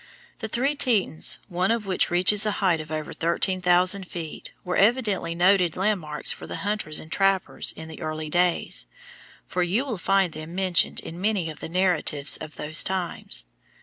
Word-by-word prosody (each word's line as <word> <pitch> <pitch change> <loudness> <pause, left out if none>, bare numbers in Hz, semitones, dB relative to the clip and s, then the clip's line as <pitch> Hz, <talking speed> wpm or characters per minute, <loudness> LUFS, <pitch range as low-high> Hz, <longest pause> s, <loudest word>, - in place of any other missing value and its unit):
The 220 - -4
Three 255 +6 0
Tetons, 225 - +2
one 180 0 -1
of 230 -2 0
which 190 -2 +2
reaches 185 +4 +4
a 210 - 0
height 185 -6 +1
of 155 0 -11
over 155 -1 -4
thirteen 185 +3 0
thousand 180 +2 +3
feet, 165 -4 -7 0.2
were 180 - -2
evidently 205 -6 +2
noted 180 -1 +3
landmarks 185 -7 0
for - - -8
the - - -6
hunters 205 -7 -1
and 155 - -12
trappers 195 -1 +1
in 160 - -10
the 160 +1 -11
early 155 -1 -4
days, 175 +2 0 0.6
for 180 - -2
you 195 +10 +1
will 230 -9 -4
find 195 -1 +1
them 155 +3 -8
mentioned 185 -2 +1
in 170 +2 -9
many 195 -6 0
of 155 - -13
the - - -7
narratives 170 -5 0
of 150 - -10
those 155 +2 +4
times. 180 - -1
180 Hz, 180 wpm, -24 LUFS, 160-195 Hz, 0.6 s, reaches